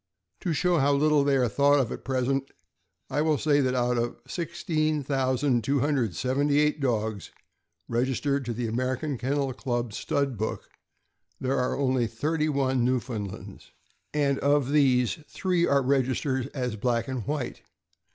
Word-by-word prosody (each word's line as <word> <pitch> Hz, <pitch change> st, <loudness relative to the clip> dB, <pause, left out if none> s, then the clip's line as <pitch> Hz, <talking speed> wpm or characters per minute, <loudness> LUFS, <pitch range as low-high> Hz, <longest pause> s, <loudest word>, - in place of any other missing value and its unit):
To 180 Hz, -, -2 dB
show 175 Hz, +2 st, +2 dB
how 140 Hz, +1 st, +3 dB
little 150 Hz, 0 st, +3 dB
they 140 Hz, -1 st, +3 dB
are 125 Hz, -2 st, +2 dB
thought 140 Hz, +5 st, +3 dB
of 125 Hz, -5 st, 0 dB
at -, -, -6 dB
present, 135 Hz, +1 st, -1 dB, 0.6 s
I 145 Hz, +3 st, +1 dB
will 155 Hz, -1 st, +2 dB
say 145 Hz, 0 st, +2 dB
that 130 Hz, -1 st, +1 dB
out 125 Hz, -1 st, +1 dB
of 120 Hz, 0 st, -3 dB
16,278 140 Hz, -, 0 dB
dogs 110 Hz, -5 st, -1 dB, 0.6 s
registered 130 Hz, +3 st, 0 dB
in 115 Hz, -, -2 dB
the 120 Hz, +1 st, -2 dB
American 130 Hz, +4 st, -2 dB
Kennel 135 Hz, 0 st, -1 dB
Club 120 Hz, -4 st, -3 dB
Stud 140 Hz, -3 st, -1 dB
Book, 110 Hz, -, -4 dB, 0.7 s
there 135 Hz, +1 st, 0 dB
are 125 Hz, -, 0 dB
only 130 Hz, -3 st, +1 dB
thirty 155 Hz, +7 st, -1 dB
one 130 Hz, -3 st, +1 dB
Newfoundlands, 120 Hz, -5 st, -4 dB, 0.4 s
and 140 Hz, -2 st, +1 dB
of 140 Hz, -1 st, +2 dB
these, 130 Hz, -3 st, +3 dB
three 180 Hz, -2 st, 0 dB
are 140 Hz, -1 st, +3 dB
registered 130 Hz, 0 st, 0 dB
as 125 Hz, -5 st, -3 dB
black 115 Hz, +1 st, 0 dB
and 130 Hz, -4 st, -4 dB
white. 145 Hz, -4 st, -3 dB
135 Hz, 140 wpm, -27 LUFS, 125-145 Hz, 0.7 s, how